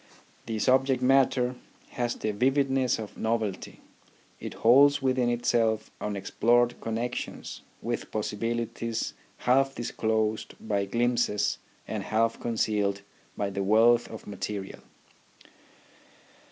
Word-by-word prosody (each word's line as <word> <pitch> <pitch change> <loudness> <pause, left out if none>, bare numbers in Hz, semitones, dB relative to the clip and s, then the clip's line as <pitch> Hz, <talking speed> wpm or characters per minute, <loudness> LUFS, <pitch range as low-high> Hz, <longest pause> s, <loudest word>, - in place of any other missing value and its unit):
The 110 - -2
subject 130 +2 +2
matter 130 -1 +3 0.4
has 120 -1 -2
the 110 - -2
vividness 135 +3 +2
of 110 -2 -8
novelty; 110 -4 -2 0.6
it - - -7
holds 140 +5 +6
within 130 -2 +1
itself 115 -2 +1
unexplored 115 +4 +1
connexions 115 +2 -4 0.2
with - - -3
possibilities 115 +2 -2 0.2
half 135 +2 +2
disclosed 110 -2 -1
by 100 -2 -1
glimpses 120 -1 0 0.3
and - - -3
half 115 +1 0
concealed 105 -3 0 0.3
by 100 -1 -1
the 100 - -3
wealth 110 +4 +4
of 110 - -9
material. 100 -1 -5
115 Hz, 100 wpm, -28 LUFS, 110-125 Hz, 0.6 s, holds